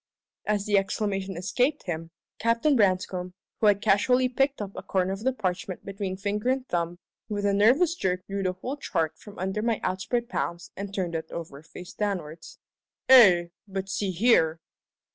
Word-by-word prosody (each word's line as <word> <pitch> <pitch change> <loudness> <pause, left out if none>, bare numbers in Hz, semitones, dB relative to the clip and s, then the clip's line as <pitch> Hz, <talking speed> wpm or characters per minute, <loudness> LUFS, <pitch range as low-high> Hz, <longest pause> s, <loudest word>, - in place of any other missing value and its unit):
As 205 -1 0
the 205 -1 +4
exclamation 195 -2 -2
escaped 250 - 0
him, 165 -2 -4 0.3
Captain 230 +6 +2
Branscome, 185 -3 +1 0.2
who 215 - +3
had 205 0 +3
casually 250 +5 +3
picked 270 +3 0
up 205 -2 -4
a - - -5
corner 190 0 0
of 195 - -5
the 260 - +2
parchment 185 -5 -4
between 195 -1 -4
finger 210 +4 -1
and 260 0 0
thumb, 175 0 -2 0.3
with 205 -1 -2
a 200 - +2
nervous 255 - +4
jerk 185 - -2
drew 200 0 -3
the 185 -1 0
whole 250 +10 -5
chart 160 - -2
from 205 -1 -13
under 190 +3 -2
my 230 -1 0
outspread 210 +6 -1
palms 170 -7 -4
and 200 0 -6
turned 185 -4 -2
it 160 -1 -4
over 155 -4 -7
face 175 +3 -11
downwards. 175 -6 -4 0.5
"Eh? 190 -10 +8 0.2
But 195 0 -4
see 195 +1 -1
here!" 175 -5 +3
195 Hz, 175 wpm, -27 LUFS, 180-225 Hz, 0.5 s, Eh